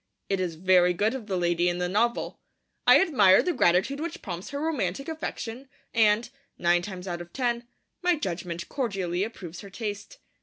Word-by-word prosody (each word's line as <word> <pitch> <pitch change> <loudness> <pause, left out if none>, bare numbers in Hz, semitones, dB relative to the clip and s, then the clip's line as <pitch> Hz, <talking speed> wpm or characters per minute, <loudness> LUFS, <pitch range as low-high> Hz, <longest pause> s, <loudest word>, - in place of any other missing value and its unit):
It 195 - +1
is 175 -3 -2
very 180 +1 +4
good 210 +6 +1
of 250 -5 -6
the 190 -3 -1
lady 175 0 +2
in 175 - -2
the 180 0 -1
novel. 230 +6 0 0.5
I - - +9
admire 210 - +5
the 360 - 0
gratitude 190 - +2
which 330 +1 -5
prompts 175 -1 -6
her 285 - -4
romantic 275 - -2
affection, 270 -5 -5 0.2
and, 220 0 +4 0.3
nine 175 0 +3
times 185 -1 -7
out 175 -1 -3
of 175 0 -10
ten, 240 -2 -1 0.3
my 355 -1 +3
judgement 175 - -4
cordially 195 -9 -2
approves 185 -6 -7
her 200 - -10
taste. 205 - -6
200 Hz, 180 wpm, -27 LUFS, 175-245 Hz, 0.5 s, I